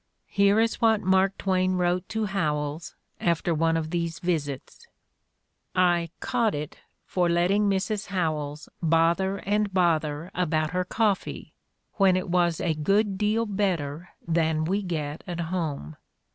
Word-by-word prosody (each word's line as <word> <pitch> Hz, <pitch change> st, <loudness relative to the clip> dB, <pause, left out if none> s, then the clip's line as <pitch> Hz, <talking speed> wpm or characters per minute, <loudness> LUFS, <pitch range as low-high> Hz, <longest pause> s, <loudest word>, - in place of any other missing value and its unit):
Here 200 Hz, +1 st, +4 dB
is 225 Hz, 0 st, +1 dB
what 220 Hz, -2 st, +4 dB
Mark 190 Hz, +1 st, +2 dB
Twain 185 Hz, -1 st, +1 dB
wrote 180 Hz, 0 st, 0 dB
to 220 Hz, -1 st, -1 dB
Howells 155 Hz, -5 st, -2 dB, 0.2 s
after 170 Hz, 0 st, +1 dB
one 165 Hz, +1 st, +2 dB
of 160 Hz, -1 st, -3 dB
these 170 Hz, -2 st, -2 dB
visits: 165 Hz, -, -3 dB, 0.9 s
"I 175 Hz, -2 st, +3 dB
'caught 235 Hz, -, 0 dB
it' 150 Hz, 0 st, -6 dB, 0.3 s
for 175 Hz, -2 st, +1 dB
letting 190 Hz, +5 st, +2 dB
Mrs. 200 Hz, +2 st, -1 dB
Howells 155 Hz, -5 st, -2 dB
bother 170 Hz, +4 st, +2 dB
and 205 Hz, +1 st, +1 dB
bother 165 Hz, -3 st, +1 dB
about 155 Hz, -3 st, 0 dB
her 180 Hz, 0 st, -1 dB
coffee, 210 Hz, 0 st, -1 dB, 0.4 s
when 190 Hz, -3 st, +4 dB
it 185 Hz, -, -3 dB
was 175 Hz, -2 st, +2 dB
'a 165 Hz, -, 0 dB
good 195 Hz, +5 st, +1 dB
deal 215 Hz, +2 st, +1 dB
better 175 Hz, -6 st, -2 dB, 0.2 s
than 160 Hz, -1 st, +1 dB
we 195 Hz, +5 st, 0 dB
get 155 Hz, -5 st, -4 dB
at 175 Hz, -1 st, -4 dB
home.' 160 Hz, -, -3 dB
175 Hz, 140 wpm, -26 LUFS, 160-195 Hz, 0.9 s, Here